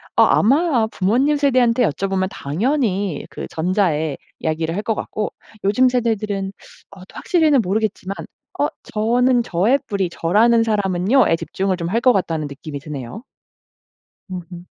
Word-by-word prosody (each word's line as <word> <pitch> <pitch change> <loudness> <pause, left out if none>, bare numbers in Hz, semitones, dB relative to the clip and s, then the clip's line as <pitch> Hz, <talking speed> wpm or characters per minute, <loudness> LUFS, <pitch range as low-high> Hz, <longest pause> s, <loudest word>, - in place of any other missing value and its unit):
아 - - +5
아마 270 0 +3
부모님 240 +10 +1
세대한테 255 -4 +3
여쭤보면 190 +4 -1
당연히 200 - -1
그 - - -7
전자의 160 -4 0 0.2
이야기를 160 +1 -2
할 205 - -1
것 225 - 0
같고 210 0 -4 0.3
요즘 250 +6 +4
세대들은 215 -5 -1 0.4
어 195 - -13
또 - - -11
확실히는 310 -7 +3
모르겠지만 200 -1 -2 0.4
어 - - +3 0.3
'저는 240 +3 +2
저의 210 +11 +2
뿌리 195 -3 -1
저라는 225 +8 +3
사람은요.'에 205 0 +2
집중을 190 +3 -2
좀 170 -1 -3
할 225 +5 +1
거 250 +1 +4
같다는 165 -6 -1
느낌이 145 +1 -8
드네요. 145 - -8 1.1
으음. 180 -1 -8
200 Hz, 315 characters per minute, -20 LUFS, 175-240 Hz, 1.1 s, 아